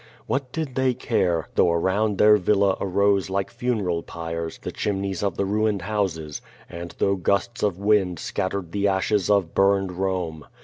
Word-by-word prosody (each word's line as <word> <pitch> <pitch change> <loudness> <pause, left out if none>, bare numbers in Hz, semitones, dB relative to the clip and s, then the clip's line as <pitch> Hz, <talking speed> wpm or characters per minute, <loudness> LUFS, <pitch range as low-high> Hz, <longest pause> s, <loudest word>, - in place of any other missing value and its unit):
What 135 -2 -2
did 155 -4 -3
they 130 -1 +1
care, 90 - 0
though 85 - +4
around 95 +5 +1
their 105 +1 +6
villa 100 0 +2
arose 100 0 +2
like 95 0 -2
funeral 110 -9 -1
piles 85 -1 -5
the - - -4
chimneys 95 -2 -2
of 100 -4 -1
the 100 - +1
ruined 105 -1 0
houses, 90 -7 -2 0.3
and 85 0 -8
though 100 - +2
gusts 100 +5 -1
of 100 -4 +1
wind 100 -3 +2
scattered 95 +2 -3
the 100 +1 +1
ashes 100 +1 +1
of 100 -5 +2
burned 95 -1 +3
Rome? 90 -4 -3
100 Hz, 165 wpm, -24 LUFS, 90-105 Hz, 0.3 s, their